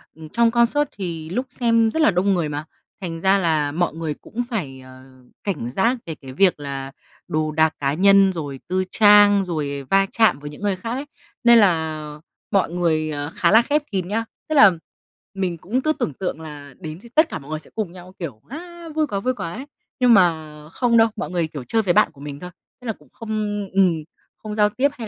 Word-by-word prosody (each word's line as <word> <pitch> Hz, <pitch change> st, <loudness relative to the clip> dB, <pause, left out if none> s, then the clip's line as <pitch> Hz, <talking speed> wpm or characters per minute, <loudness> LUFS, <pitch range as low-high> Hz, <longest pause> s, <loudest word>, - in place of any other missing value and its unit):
ừm, 160 Hz, 0 st, -11 dB
trong 235 Hz, +5 st, +3 dB
concert 240 Hz, +5 st, +2 dB
thì 165 Hz, -5 st, -5 dB
lúc 245 Hz, +9 st, -2 dB
xem 230 Hz, -3 st, +2 dB
rất 320 Hz, -, 0 dB
là 225 Hz, -, +5 dB
đông 190 Hz, +2 st, +2 dB
người 170 Hz, -5 st, 0 dB
mà, 150 Hz, +1 st, -4 dB, 0.4 s
thành 165 Hz, -3 st, -5 dB
ra 195 Hz, +2 st, +4 dB
là 155 Hz, -6 st, +1 dB
mọi 175 Hz, +2 st, 0 dB
người 160 Hz, -1 st, -3 dB
cũng 235 Hz, +10 st, -5 dB
phải, 150 Hz, -, -4 dB
ờ, 130 Hz, 0 st, -14 dB, 0.4 s
cảnh 185 Hz, -, -3 dB
giác 230 Hz, -, +1 dB
về 160 Hz, -, -5 dB
cái 135 Hz, -3 st, -11 dB
việc 180 Hz, +2 st, +3 dB
là 135 Hz, -1 st, -5 dB, 0.4 s
đồ 155 Hz, 0 st, -1 dB
đạc 160 Hz, 0 st, +2 dB
cá 140 Hz, -1 st, 0 dB
nhân 195 Hz, +3 st, +5 dB
rồi 145 Hz, -5 st, -5 dB
tư 185 Hz, +1 st, 0 dB
trang, 205 Hz, -2 st, +6 dB
rồi 145 Hz, -5 st, -3 dB
va 195 Hz, 0 st, +4 dB
chạm 220 Hz, -, +3 dB
với 145 Hz, 0 st, -7 dB
những 150 Hz, -, -12 dB
người 205 Hz, -2 st, 0 dB
khác 205 Hz, +5 st, -6 dB
ấy. 265 Hz, +4 st, -3 dB, 0.4 s
Nên 235 Hz, 0 st, +7 dB
là 160 Hz, -7 st, +2 dB, 0.5 s
mọi 195 Hz, -4 st, +2 dB
người 160 Hz, -3 st, 0 dB, 0.2 s
khá 170 Hz, -, +2 dB
là 220 Hz, +2 st, +7 dB
khép 290 Hz, +4 st, 0 dB
kín 190 Hz, -3 st, -2 dB
nhá. 225 Hz, +4 st, -1 dB, 0.2 s
Tức 310 Hz, -, 0 dB
là 275 Hz, -9 st, +8 dB, 0.6 s
mình 185 Hz, -3 st, -2 dB
cũng 220 Hz, +11 st, -2 dB
cứ 310 Hz, +3 st, +1 dB
tưởng 155 Hz, -, -3 dB
tượng 180 Hz, 0 st, -4 dB
là 145 Hz, -3 st, -10 dB
đến 160 Hz, -2 st, -7 dB
thì 235 Hz, -, -14 dB
tất 315 Hz, +1 st, +5 dB
cả -, -, -5 dB
mọi 140 Hz, 0 st, -14 dB
người 155 Hz, -, -2 dB
sẽ -, -, -11 dB
cùng 215 Hz, -6 st, -3 dB
nhau 180 Hz, 0 st, -13 dB
kiểu 140 Hz, -, -6 dB
á, 340 Hz, +4 st, -9 dB
vui 310 Hz, -1 st, +1 dB
quá, 200 Hz, -7 st, -2 dB
vui 255 Hz, +6 st, 0 dB
quá 170 Hz, -8 st, -5 dB
ấy, 260 Hz, +5 st, -7 dB, 0.3 s
nhưng 250 Hz, -2 st, +5 dB
mà 165 Hz, -6 st, +3 dB, 0.2 s
không 235 Hz, +6 st, +1 dB
đâu, 225 Hz, 0 st, +6 dB
mọi -, -, -4 dB
người, 175 Hz, -3 st, -1 dB
kiểu, 150 Hz, -4 st, -7 dB
chơi 225 Hz, -, +1 dB
với 185 Hz, -5 st, +1 dB
bạn -, -, +4 dB
của 140 Hz, -, -17 dB
mình 145 Hz, -1 st, -7 dB
thôi, 180 Hz, -, -8 dB, 0.3 s
tức 250 Hz, -, -9 dB
là 225 Hz, -, -1 dB
cũng 150 Hz, -8 st, -23 dB
không 225 Hz, -, -10 dB, 0.4 s
ừm, 190 Hz, -3 st, +4 dB, 0.4 s
không 215 Hz, -1 st, -7 dB
giao 210 Hz, -1 st, +4 dB
tiếp 265 Hz, +7 st, +1 dB
hay 230 Hz, -3 st, -6 dB
185 Hz, 225 wpm, -22 LUFS, 155-225 Hz, 0.6 s, là